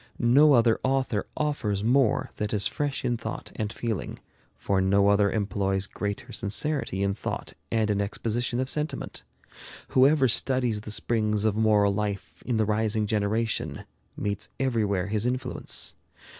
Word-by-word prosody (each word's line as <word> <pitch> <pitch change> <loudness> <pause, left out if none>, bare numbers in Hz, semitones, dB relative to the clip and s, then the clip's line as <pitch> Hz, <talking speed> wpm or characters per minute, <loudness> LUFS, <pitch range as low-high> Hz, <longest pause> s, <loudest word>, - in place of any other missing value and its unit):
No 140 +5 +5
other 115 -2 +4
author 130 -5 0
offers 115 -10 -1
more 125 0 +2
that 105 0 -2
is 100 -2 +1
fresh 145 +7 -2
in 120 -1 +1
thought 110 -1 -6
and 105 -1 -2
feeling, 115 -3 -4 0.4
for 95 -1 0
no 100 +1 +3
other 100 0 +3
employs 100 -2 0
greater 100 +1 -5
sincerity 110 -2 -1
in 100 0 +1
thought 100 - -5 0.2
and 110 -2 +2
in 100 0 +1
exposition 120 +4 -1
of 130 - 0
sentiment. 150 0 -2 0.7
Whoever 135 +1 +5
studies 125 -3 +2
the 110 - -8
springs 110 -1 0
of 110 -2 +2
moral 105 -2 +3
life 100 0 -4
in 120 -3 +1
the 110 - +2
rising 110 0 +1
generation, 110 +1 -1 0.3
meets 100 0 -3
everywhere 110 -8 0
his 105 +3 -1
influence. 125 0 -2
110 Hz, 145 wpm, -27 LUFS, 100-125 Hz, 0.7 s, No